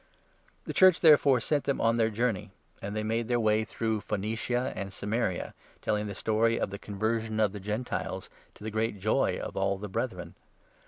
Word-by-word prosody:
The - - -4
Church, 185 -2 +6
therefore, 145 -5 +6
sent 145 +4 0
them 140 - 0
on 115 +1 +2
their 115 -1 +3
journey, 115 -2 -1 0.3
and 100 +1 -5
they 110 - 0
3 110 - -3
made 115 +1 0
their 120 0 +1
way 110 -1 +3
through 110 -1 -2
Phoenicia 110 +5 -2
and 100 -1 -5
Samaria, 105 -1 -2 0.3
telling 105 -1 -1
the 100 - -5
story 115 +3 +1
of - - -1
the 100 - -6
conversion 110 +2 -2
of 105 -2 +2
the 105 - -6
Gentiles, 105 +5 -3 0.3
to - - -14
the 110 - -4
great 110 0 -1
joy 105 +3 +1
of - - -6
all 95 0 +1
the 105 +2 -6
Brethren. 90 -5 -3
110 Hz, 195 wpm, -29 LUFS, 105-115 Hz, 0.3 s, Church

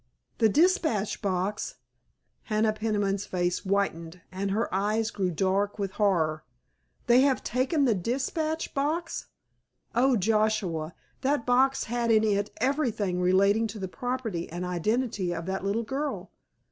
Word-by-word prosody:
"The 225 -2 +5
dispatch 310 - +2
box?" 195 +1 -2 0.7
Hannah 215 0 +1
Peniman's 205 -2 -1
face 175 -1 0
whitened 180 -4 -1
and 195 +1 -2
her 215 +4 0
eyes 215 +3 0
grew 190 -3 -1
dark 195 +4 0
with 200 -2 -2
horror. 170 -7 +1 0.6
"They 240 +2 +6
have 270 -2 +2
taken 270 +4 +1
the 240 - +4
dispatch 275 - -2
box? 310 +4 -2 0.7
Oh, 255 +1 +3
Joshua, 200 -6 0 0.3
that 275 -2 0
box 265 +2 +3
had 235 0 -1
in 220 -1 +5
it 205 -1 +1
everything 230 -9 0
relating 200 +5 +3
to 215 0 -8
the 190 -2 -4
property 245 -6 -3
and 175 +2 -4
identity 185 +1 -1
of 165 0 -5
that 190 +1 -3
little 205 +4 0
girl!" 275 +5 -4
215 Hz, 135 wpm, -27 LUFS, 190-250 Hz, 0.7 s, They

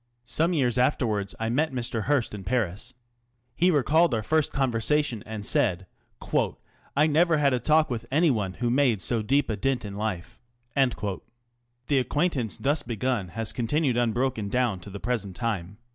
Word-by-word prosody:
Some 165 +7 +1
years 125 -6 +1
afterwards 110 -7 0
I 115 0 -1
met 150 +6 +1
Mr. 120 -4 -3
Hearst 145 -7 +1
in 100 -2 -6
Paris. 115 +1 -2 0.6
He 180 +7 +3
recalled 155 -1 +3
our 110 - -2
first 155 +5 +1
conversation, 130 -1 0
and 110 -2 -5
said, 95 -4 +1 0.5
" - - -6
I 150 - +5
never 160 +1 +3
had 140 -2 +3
a 125 - +1
talk 155 +4 +3
with 120 -1 -4
anyone 130 - +2
which - - -18
made 125 -5 +3
so 115 +4 0
deep 140 +7 +2
a - - -1
dint 125 +1 -1
in 100 -1 -6
life." 100 -5 -4 0.4
The 120 +2 -2
acquaintance 130 - -1
thus 145 +2 +1
begun 120 -4 -2
has 115 -1 -2
continued 130 +2 0
un 120 -2 +2
broken 120 -3 -1
down 120 -5 0
to 95 - -10
the 100 +1 -7
present 105 -6 -2
time. 105 -5 -3
120 Hz, 170 wpm, -26 LUFS, 110-140 Hz, 0.6 s, I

